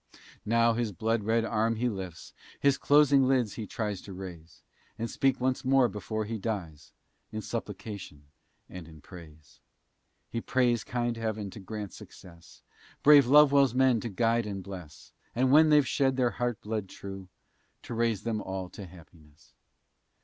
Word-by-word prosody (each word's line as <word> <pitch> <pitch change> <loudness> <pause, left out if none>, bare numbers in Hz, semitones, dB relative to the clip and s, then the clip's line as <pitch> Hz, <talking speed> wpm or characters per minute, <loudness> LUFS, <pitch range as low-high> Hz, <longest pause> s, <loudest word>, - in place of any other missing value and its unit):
now 115 +1 +3
his 115 -2 -2
blood 110 +4 -1
red 115 +1 +1
arm 115 +1 0
he 120 +3 -1
lifts, 95 -7 -6 0.3
His 140 -1 +3
closing 145 -2 +4
lids 125 -6 +1
he 110 -3 -6
tries 105 -3 -4
to 100 - -10
raise; 90 -3 -10 0.3
And 115 - -3
speak 135 +2 0
once 130 +1 -1
more 135 -1 +4
before 110 +1 -4
he 110 +1 -4
dies, 90 -8 -5 0.4
In 110 - -4
supplication 105 -8 -7 0.4
and 90 -3 -10
in 80 -2 -14
praise. 75 -5 -14 0.7
He 115 - -4
prays 120 -3 +1
kind 120 -1 -2
heaven 110 -3 -3
to 110 - -10
grant 105 0 -7
success, 85 -3 -15 0.4
Brave 145 -3 +7
Lovewell's 140 -2 +5
men 130 -3 +4
to 115 - -5
guide 115 +2 +1
and 100 -2 -5
bless, 90 -6 -11 0.2
And 130 +2 +2
when 155 +2 +6
they've 150 -2 +5
shed 135 -2 +1
their 125 -2 +2
heart 120 -2 -2
blood 105 -3 -4
true, 95 -1 -9 0.5
To - - -7
raise 115 -3 0
them 110 -2 -2
all 95 -2 -5
to 100 0 -10
happiness. 80 -4 -19
110 Hz, 160 wpm, -29 LUFS, 95-125 Hz, 0.7 s, Brave